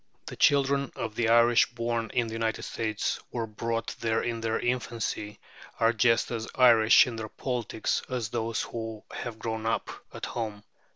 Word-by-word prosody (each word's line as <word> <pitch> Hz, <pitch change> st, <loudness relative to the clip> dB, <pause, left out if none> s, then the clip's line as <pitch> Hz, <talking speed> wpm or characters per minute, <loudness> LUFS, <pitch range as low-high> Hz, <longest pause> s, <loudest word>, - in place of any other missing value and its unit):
The -, -, -7 dB
children 140 Hz, -1 st, +3 dB
of 110 Hz, -2 st, -4 dB
the 115 Hz, 0 st, 0 dB
Irish 120 Hz, 0 st, +5 dB
born 115 Hz, -1 st, -2 dB
in 120 Hz, -, +1 dB
the 110 Hz, -, -6 dB
United 115 Hz, 0 st, -1 dB
States 110 Hz, -2 st, -2 dB
or 115 Hz, -2 st, -2 dB
brought 115 Hz, +1 st, -3 dB
there 115 Hz, 0 st, 0 dB
in 115 Hz, -1 st, -2 dB
their 115 Hz, 0 st, 0 dB
infancy 115 Hz, -3 st, -2 dB, 0.4 s
are 115 Hz, 0 st, +4 dB
just 115 Hz, +1 st, +3 dB
as 115 Hz, -1 st, -3 dB
Irish 115 Hz, -3 st, +7 dB
in 120 Hz, -2 st, -5 dB
their 110 Hz, -1 st, -5 dB
politics 120 Hz, -4 st, -2 dB
as 120 Hz, -5 st, -2 dB
those 115 Hz, -1 st, -2 dB
who 115 Hz, -2 st, -6 dB
have 120 Hz, -2 st, -6 dB
grown 110 Hz, 0 st, -3 dB
up 115 Hz, -, -1 dB, 0.2 s
at -, -, -6 dB
home. 105 Hz, -3 st, -4 dB
115 Hz, 170 wpm, -28 LUFS, 110-120 Hz, 0.4 s, Irish